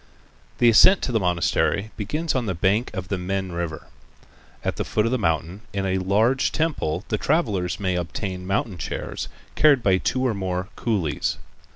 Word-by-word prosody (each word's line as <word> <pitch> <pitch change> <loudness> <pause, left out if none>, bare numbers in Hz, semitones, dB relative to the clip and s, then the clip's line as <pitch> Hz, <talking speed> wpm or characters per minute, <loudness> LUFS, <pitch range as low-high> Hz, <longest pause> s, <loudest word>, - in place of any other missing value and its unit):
The 120 - +4
ascent 180 - +7
to - - -1
the 115 - +2
monastery 95 +3 +1
begins 150 +10 -2
on 125 -4 -1
the 95 - -1
bank 100 +7 +1
of 95 -1 -5
the 95 - -1
Min 95 +1 -2
River. 85 -2 -4 0.8
At - - -2
the - - -1
foot 105 - 0
of 115 - 0
the 130 - +1
mountain 85 +1 -1
in 100 -1 -1
a 95 0 0
large 110 +8 +2
temple 120 - -1
the 110 - 0
traveler 110 - +1
may 95 -2 -1
obtain 90 +1 -4
mountain 95 -1 -1
chairs - - -4 0.3
carried 145 -5 +4
by 95 -2 +3
two 130 +6 0
or 125 - +2
more 95 -1 -3
coolies. 100 -10 -1
100 Hz, 180 wpm, -24 LUFS, 90-115 Hz, 0.8 s, ascent